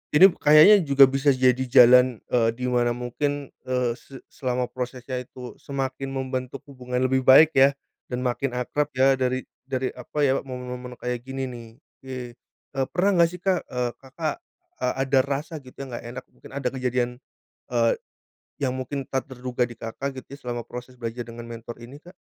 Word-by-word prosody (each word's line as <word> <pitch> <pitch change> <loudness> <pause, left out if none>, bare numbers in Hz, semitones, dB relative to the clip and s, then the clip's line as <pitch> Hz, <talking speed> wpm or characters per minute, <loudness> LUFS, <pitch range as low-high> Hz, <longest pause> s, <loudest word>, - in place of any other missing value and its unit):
Ini 170 +6 +9
kayaknya 155 +8 +8
juga 140 0 +7
bisa 135 +1 +4
jadi 130 -1 +3
jalan, 125 -1 +6
eee, 115 -2 +3
di 125 - -7
mana 120 -1 +2
mungkin, 140 +3 -3 0.2
eee, 125 -2 +1
se 135 -1 -13
selama 125 -1 -2
prosesnya 125 0 -4
itu 125 0 -9
semakin 135 -1 -4
membentuk 130 0 -4
hubungan 125 -2 -3
lebih 130 0 +1
baik 150 +4 +8
ya, 135 -1 +5 0.3
dan 125 0 -3
makin 125 +1 -1
akrab 140 +4 -1
ya 135 +1 +4
dari 130 0 0 0.2
dari 130 -1 -1
apa 135 +4 -4
ya 135 -1 +3
momen-momen 125 -1 -7
kayak 125 0 -3
gini 135 0 -4
nih. 120 -3 -6 0.3
Oke, 130 -1 -8 0.6
eee, 135 -1 -1
pernah 185 +1 +3
enggak 170 -1 +6
sih - - -10
Kak, 190 -2 0
eee, 125 -1 -2
Kakak, 155 - -4 0.4
eee, - - 0
ada 135 0 +3
rasa 145 +3 -3
gitu 130 -3 -16
yang 135 -2 -8
enggak 120 - -6
enak 125 +2 -7
mungkin - - -16
ada 140 -2 -1
kejadian, 125 -2 -1 0.6
eee, 115 -1 +3 0.7
yang 130 - +1
mungkin 130 +2 -4
tak 135 +1 -2
terduga 125 -1 -2
di 120 - -11
Kakak 130 +5 -5
gitu - - -18
ya - - -17
selama 120 -2 -4
proses 125 +2 -9
belajar 120 0 -5
dengan 115 0 -8
mentor 115 0 -8
ini 130 +5 -11
Kak? 175 +4 -16
130 Hz, 180 wpm, -25 LUFS, 125-135 Hz, 0.7 s, Ini